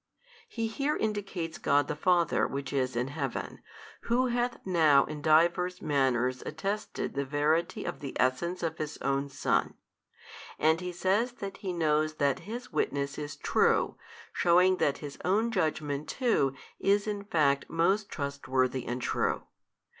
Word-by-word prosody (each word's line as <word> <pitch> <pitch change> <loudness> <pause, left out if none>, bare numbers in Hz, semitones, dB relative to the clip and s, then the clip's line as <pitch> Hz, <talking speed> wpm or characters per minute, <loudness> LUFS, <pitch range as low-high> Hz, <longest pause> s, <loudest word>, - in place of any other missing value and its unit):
He 230 -1 -3
here 280 +7 -1
indicates 195 -6 -3
God 145 0 +2
the - - -2
Father 170 +1 +2
Which 140 0 -5
is 130 -3 0
in 125 +2 -1
heaven 140 -3 -4 0.4
Who 250 +2 +2
hath 240 0 0
now 155 -7 +5
in 150 -1 -7
divers 170 +4 +3
manners 130 -4 +1
attested 195 +8 -3
the 140 - -1
Verity 150 +4 0
of - - -4
the 140 -3 -6
Essence 170 +9 0
of 160 -1 -2
His 155 0 -4
Own 135 +1 0
Son; 135 - 0 0.8
and 160 +3 +3
He 180 0 -4
says 195 +7 +1
that 195 -5 -7
He 190 - -4
knows 155 -2 +1
that 140 -3 +1
His 245 +2 -6
witness 140 0 -1
is 145 -1 -5
True - - +2 0.4
shewing 180 +2 +4
that 140 -4 +1
His 145 - -8
Own 215 +6 +2
Judgement 155 -6 -1
too 215 - +1 0.2
is 200 +1 +2
in 205 -2 -3
fact 150 -9 +1
most 190 +5 +1
trustworthy 130 -3 -1
and 125 +1 -3
true. - - 0
155 Hz, 150 wpm, -29 LUFS, 140-195 Hz, 0.8 s, now